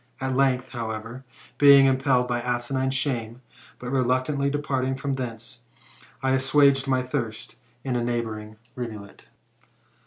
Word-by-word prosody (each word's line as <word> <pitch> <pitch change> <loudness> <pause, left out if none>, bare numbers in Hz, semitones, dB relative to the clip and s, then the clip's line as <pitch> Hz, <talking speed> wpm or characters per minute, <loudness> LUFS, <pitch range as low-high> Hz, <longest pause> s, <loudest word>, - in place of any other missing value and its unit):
At 130 0 -2
length, 130 -1 +1
however, 115 +1 -6 0.3
being 140 -1 +8
im 130 -1 +3
pelled 125 -2 +2
by 120 -1 -1
asinine 125 +2 -1
shame, 125 -3 -2 0.3
but 125 0 -7
reluctantly 130 +2 +1
departing 135 -2 -1
from 135 +1 -3
thence, 120 -1 -6 0.6
I 130 - +2
assuaged 135 +1 +3
my 130 -1 +1
thirst 125 -5 -5 0.3
in 130 -2 -2
a 120 - 0
neighbouring 110 -3 -3 0.2
rivulet. 110 -5 -8
130 Hz, 130 wpm, -25 LUFS, 120-135 Hz, 0.6 s, being